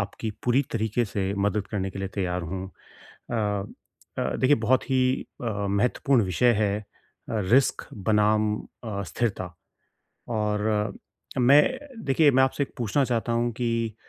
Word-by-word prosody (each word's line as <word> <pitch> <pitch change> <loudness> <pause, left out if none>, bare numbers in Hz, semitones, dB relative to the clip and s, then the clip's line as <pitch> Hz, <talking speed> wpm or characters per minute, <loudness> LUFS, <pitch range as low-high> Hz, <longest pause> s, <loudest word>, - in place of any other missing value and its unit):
आपकी 100 +2 -4
पूरी 125 +3 +3
तरीके 110 +1 0
से 100 -1 -2
मदद 100 0 -1
करने 95 -3 -2
के 95 - -8
लिए 95 - -3
तैयार 90 -3 -1
हूँ। 95 +3 -4
अ - - -24 1.2
अ, - - -1
देखिए 135 +3 +4
बहुत 130 0 +4
ही 130 -1 +3 0.4
अ, 115 - 0 0.2
महत्वपूर्ण 120 +4 +2
विषय 120 +7 +3
है 100 -1 +1
अ, - - -11 0.7
रिस्क 135 +1 +3
बनाम 105 +1 +2 0.3
अ, 100 -3 -3
स्थिरता। 95 -5 -3 0.8
और 105 -1 0 0.4
मैं 140 +4 +7 0.4
देखिए, 145 +2 +4
मैं 130 0 +4
आपसे 135 +2 -1
एक - - -4
पूछना 125 +4 +1
चाहता 120 -1 -1
हूँ 120 +1 +1
कि 115 -2 -1
110 Hz, 145 wpm, -26 LUFS, 100-125 Hz, 1.2 s, मैं